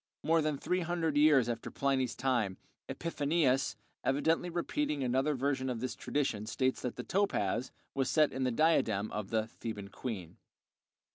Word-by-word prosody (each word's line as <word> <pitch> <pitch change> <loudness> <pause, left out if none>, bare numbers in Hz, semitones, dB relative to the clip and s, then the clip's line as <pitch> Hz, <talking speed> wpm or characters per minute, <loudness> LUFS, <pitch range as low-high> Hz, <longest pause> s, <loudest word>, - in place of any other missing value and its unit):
More 165 0 +3
than 150 -2 0
three 180 +6 0
hundred 170 -3 -1
years 145 -5 +5
after 115 -1 -3
Pliny's 130 -3 0
time, 120 -8 0 0.3
Epiphanius, 145 -6 +1 0.3
evidently 160 +6 +1
repeating 170 - -1
another 130 +4 +1
version 130 0 0
of 120 -2 -2
this 130 +1 -2
tradition, 110 -7 -1
states 130 +3 0
that 125 - -3
the 125 - -5
"topaz" 130 - 0 0.2
was 135 -2 0
set 155 -2 +3
in 130 - -2
the 130 - +2
diadem 115 -7 +2
of 105 -2 -4
the 110 -1 +1
"Theban 105 -3 -7
queen." 100 -5 -6
130 Hz, 155 wpm, -32 LUFS, 115-155 Hz, 0.3 s, years